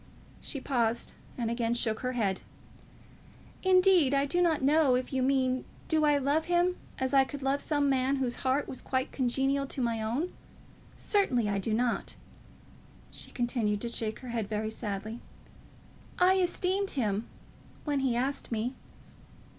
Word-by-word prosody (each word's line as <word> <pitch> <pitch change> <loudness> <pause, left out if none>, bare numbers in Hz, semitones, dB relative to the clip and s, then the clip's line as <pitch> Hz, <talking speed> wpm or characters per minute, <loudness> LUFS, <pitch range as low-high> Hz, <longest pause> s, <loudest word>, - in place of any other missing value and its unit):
She 280 - -4
paused, 235 -4 0 0.2
and 230 -2 -1
again 235 0 0
shook 220 -2 0
her 255 0 -2
head. 200 -6 0 1.2
"Indeed, 365 -6 +5
I 275 0 +3
do 350 +5 +1
not 325 -5 +2
know. 285 -2 +4
If 255 +2 -2
you 260 - +1
mean, 260 -1 +2 0.2
do 310 -1 +2
I 295 -1 +4
love 285 +3 +1
him, 350 +1 +2 0.2
as 260 +1 -1
I 270 -1 +7
could 280 +1 -7
love 275 +1 +1
some 290 -2 +1
man 265 0 +2
whose 255 -3 -1
heart 265 +2 +1
was 260 - -6
quite 260 -1 -1
congenial 270 +2 0
to 275 - -6
my 230 -3 0
own, 250 +11 -2 0.6
certainly 260 - +1
I 200 -1 0
do 205 +3 -2
not." 235 +2 0 1.0
She - - -4
continued 235 -4 0
to 235 - -3
shake 220 -2 -2
her 255 - -8
head 225 -4 -2
very 215 0 -2
sadly. 215 +1 -5 1.0
"I 375 +1 +5
esteemed 375 +2 0
him, 215 -3 0 0.6
when 290 -2 0
he 265 -3 +1
asked 265 +3 -2
me." 230 +3 -1
260 Hz, 160 wpm, -30 LUFS, 235-285 Hz, 1.2 s, I